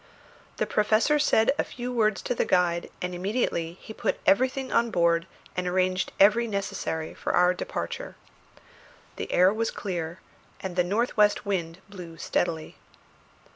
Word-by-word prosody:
The - - +1
Professor 220 +8 +2
said 225 -6 +3
a - - +3
few 250 0 -6
words 215 -4 +1
to - - -1
the - - 0
guide, 175 -1 +1
and 180 0 -3
immediately 175 -3 -1
he 220 - -9
put - - -2
everything 260 +4 +2
on 235 0 +3
board 170 -3 +2 0.3
and 180 0 -2
arranged 185 0 0
every 215 +4 +5
necessary 195 -6 -3
for - - -3
our 180 0 +4
departure. - - -5 1.0
The - - -5
air 185 +2 +5
was 225 +1 -1
clear 170 -3 -4 0.4
and 190 -2 -5
the 180 - +3
north 210 +7 0
west 210 +1 +3
wind 180 -3 -2
blew 180 -5 -10
steadily. 160 -1 -2
190 Hz, 150 wpm, -26 LUFS, 175-220 Hz, 1.0 s, every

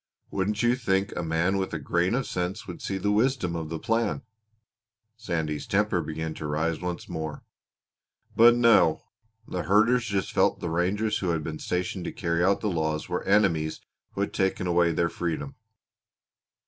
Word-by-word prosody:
Wouldn't 105 +3 -1
you 120 +1 +4
think 95 -6 0
a - - -2
man 85 +4 +1
with 95 -3 -2
a - - 0
grain 85 +7 0
of 135 -1 -1
sense 90 +1 -3
would 90 - -8
see 95 - -2
the 105 +2 0
wisdom 110 -5 +1
of 80 -2 -4
the 80 - -3
plan!" 115 - -1 0.9
Sandy's 80 -9 -3
temper - - +1
began 80 0 -4
to 75 - -6
rise 80 +3 -1
once 90 -2 -4
more. 80 -1 -5 0.9
"But 120 +1 +7
no! 115 -9 +4 0.4
The 90 - -3
herders 110 +8 +3
just 100 -4 -1
felt - - +2
the 85 - -3
rangers 95 +6 0
who 90 - -1
had 80 -2 0
been 80 -1 -5
stationed 90 0 -2
to - - -3
carry 85 0 -1
out 95 +2 +2
the 110 - -1
laws 80 -3 -1
were 90 - -1
enemies 85 -7 +2 0.3
who 100 - -3
had 100 - -2
taken 95 -1 0
away 85 -1 +3
their 85 +1 +1
freedom. 85 - -3
90 Hz, 175 wpm, -27 LUFS, 80-105 Hz, 0.9 s, But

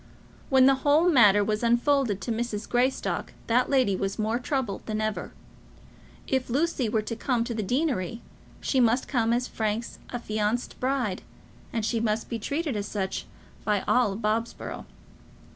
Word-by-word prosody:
When 265 -2 +6
the 270 - +7
whole 300 +5 +4
matter 210 - +6
was 210 +1 -1
unfolded 240 -2 +2
to 235 - -3
Mrs. 225 -2 -3
Greystock, 250 +2 0
that 245 +2 +2
lady 255 -8 +3
was 195 +1 -2
more 220 +2 0
troubled 250 -6 -2
than 215 -1 -2
ever. 215 -1 -2 0.9
If 265 -2 -1
Lucy 275 -2 0
were 220 0 0
to 230 - -4
come 235 0 0
to 235 0 -4
the 220 - -2
deanery, 235 - -1 0.4
she 265 - +1
must 240 +1 +3
come 230 -4 +1
as 245 +1 +1
Frank's 220 +1 -3
affianced 220 -1 -2
bride, 250 -7 -1 0.5
and 225 -2 -1 0.2
must 215 0 -1
be 230 - -3
treated 285 +4 -2
as 205 0 -2
such 195 -3 -3 0.4
by 210 -2 +1
all 240 -6 +3
Bobsborough. 225 +1 -3
235 Hz, 155 wpm, -27 LUFS, 215-255 Hz, 0.9 s, the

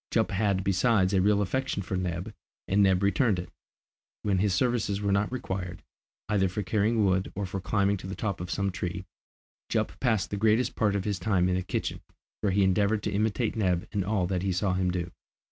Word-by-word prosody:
Jup 110 -1 +1
had 100 -1 +1
besides 100 0 +2
a 95 - +4
real 105 +1 +3
affection 130 0 -2
for 95 - -3
Neb, 90 -1 -3 0.3
and 100 +2 +3
Neb 95 -1 +4
returned 105 0 +2
it. 90 0 -6 0.7
When 100 -3 +1
his 100 +1 +2
services 105 -1 +1
were 100 -1 0
not 100 +3 +1
required, 95 -8 -4 0.4
either 100 -3 +2
for 105 +3 -3
carrying 105 +3 +2
wood 95 0 +1
or 100 0 -2
for 95 +1 -4
climbing 100 +1 +1
to 95 - -8
the 95 - -5
top 100 -5 -3
of 90 - -5
some 100 +2 -1
tree, 90 0 -4 0.6
Jup - - -1
passed 110 -6 +1
the 100 - -2
greatest 110 +4 +2
part 105 -3 +1
of 100 - -1
his 100 -3 -1
time 95 -5 +2
in 90 - +1
the 90 - 0
kitchen, - - -3 0.4
where 100 - 0
he 100 +1 +3
endeavoured 100 +3 +2
to - - -1
imitate 110 +3 0
Neb 90 -5 0
in 100 -3 0
all 100 -1 0
that 90 0 -1
he 95 0 0
saw 95 +1 0
him 90 0 +1
do. 90 -1 -3
100 Hz, 215 wpm, -28 LUFS, 95-105 Hz, 0.7 s, a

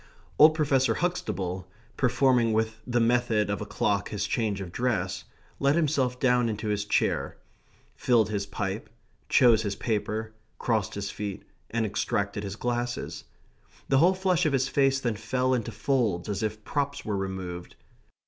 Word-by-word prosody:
Old 155 +1 +8
Professor 135 -4 +2
Huxtable, 95 - -2 0.3
performing 125 -3 +3
with 110 0 -1
the 120 -1 +1
method 115 -3 +2
of 100 - -2
a 105 - -5
clock 100 0 0
his 105 -1 -2
change 105 -1 -1
of 95 -3 -6
dress, 95 -6 -1 0.3
let 140 +1 +3
himself 140 -6 +1
down 125 -2 +3
into 105 0 -3
his 105 -1 -1
chair; 105 - 0 0.6
filled 115 -4 +3
his 100 -1 -2
pipe; 100 +1 -4 0.4
chose 120 -4 +5
his 100 -2 -2
paper; 110 0 -2 0.2
crossed 110 -5 -1
his 100 0 -3
feet; 105 -2 -5 0.3
and 115 -1 0
extracted 100 0 -1
his 100 -1 -5
glasses. 120 -10 -3 0.6
The 135 - +4
whole 180 +5 +5
flesh 185 -4 +2
of 145 - 0
his 135 -1 +2
face 135 -1 +2
then 120 -5 -1
fell 130 +3 0
into 120 -4 -1
folds 115 -11 0
as 100 -1 -2
if 110 0 -3
props 140 +2 -2
were 105 - -1
removed. 95 -2 -5
110 Hz, 160 wpm, -27 LUFS, 100-130 Hz, 0.6 s, Old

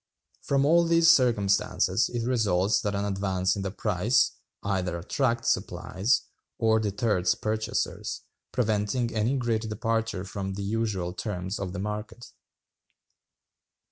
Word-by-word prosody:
From 140 0 +1
all 170 +3 +5
these 165 0 +6
circumstances 115 -9 +2
it 120 -1 -3
results 105 -5 +2
that 105 -1 -2
an 100 +1 -1
advance 95 -2 0
in 100 - -3
the 95 - -2
price... 95 - +1 0.3
either 95 -3 -1
attracts 115 +6 0
supplies, 110 +9 -1 0.3
or 110 -1 +3
deters 100 -3 +1
purchasers,... 110 0 -2 0.3
preventing 110 0 0
any 115 +5 +1
great 115 -3 -1
departure 115 -2 -1
from 95 0 -5
the 100 - -4
usual 100 -4 -1
terms 95 -1 -4
of 95 -2 -3
the 100 - -6
market. 105 +3 -5
105 Hz, 125 wpm, -27 LUFS, 95-115 Hz, 0.3 s, these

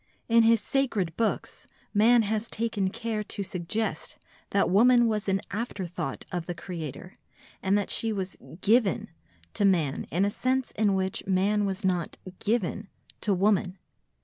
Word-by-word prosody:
In 230 0 +5
his 230 0 +5
sacred 205 - 0
books 225 -2 -2 0.3
man 225 +3 +5
has 215 +2 -1
taken 220 -4 -1
care 225 0 -3
to 200 - -4
suggest 190 +4 -3 0.3
that 200 - +2
woman 240 +5 +5
was 215 -3 0
an 195 0 +1
afterthought 185 - -4
of 175 -2 -3
the 175 - -3
Creator, 170 0 -7 0.5
and 195 +1 +2
that 205 - -1
she 225 - +1
was 190 -3 -3 0.3
"given" 220 -2 +2 0.4
to - - -1
man 170 -8 +2
in 180 +6 +1
a 205 - 0
sense 255 +3 -1
in 205 -2 +1
which 190 0 -2
man 200 +2 +2
was 195 +1 -3
not 180 -3 -1 0.2
"given" 210 -4 -1 0.3
to 210 - 0
woman. 195 -1 +2
200 Hz, 150 wpm, -27 LUFS, 185-225 Hz, 0.5 s, In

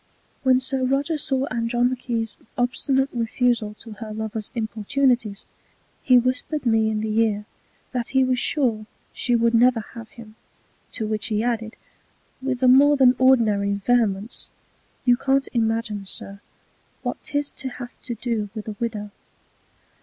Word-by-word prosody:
When 260 -1 +4
Sir 260 0 -1
Roger 280 +4 0
saw 270 -2 0
Andromache's 240 -1 -1 0.2
obstinate 265 +2 +1
Refusal 230 -2 0
to 225 +1 -11
her 215 0 -8
Lover's 220 0 -4
importunities, 225 0 0 0.6
he 255 -2 +5
whisper'd 255 +4 0
me 225 -2 +3
in 215 -1 -1
the 220 0 0
Ear, 210 -2 +1 0.5
that 245 -3 -2
he 265 -1 +3
was 255 -1 +1
sure 230 -9 0 0.3
she 245 - +1
would 235 0 +2
never 235 0 +4
have 230 -2 -9
him; 225 -2 -13 0.6
to 225 - -3
which 215 -1 -1
he 215 -1 0
added, 225 -2 -2 0.7
with 260 -1 -2
a - - +6
more 285 +3 +6
than 255 -2 +6
ordinary 215 -6 +3
Vehemence, 215 0 0 0.6
You 245 -1 +5
can't 270 +1 +1
imagine, 225 -3 -1
Sir, 200 +1 -6 0.6
what - - -3
'tis 290 0 -2
to 265 - -4
have 245 -1 -8
to 240 - -5
do 225 -3 -2
with 215 -1 -6
a 215 - -5
Widow. 210 -3 -3
235 Hz, 145 wpm, -23 LUFS, 220-255 Hz, 0.7 s, a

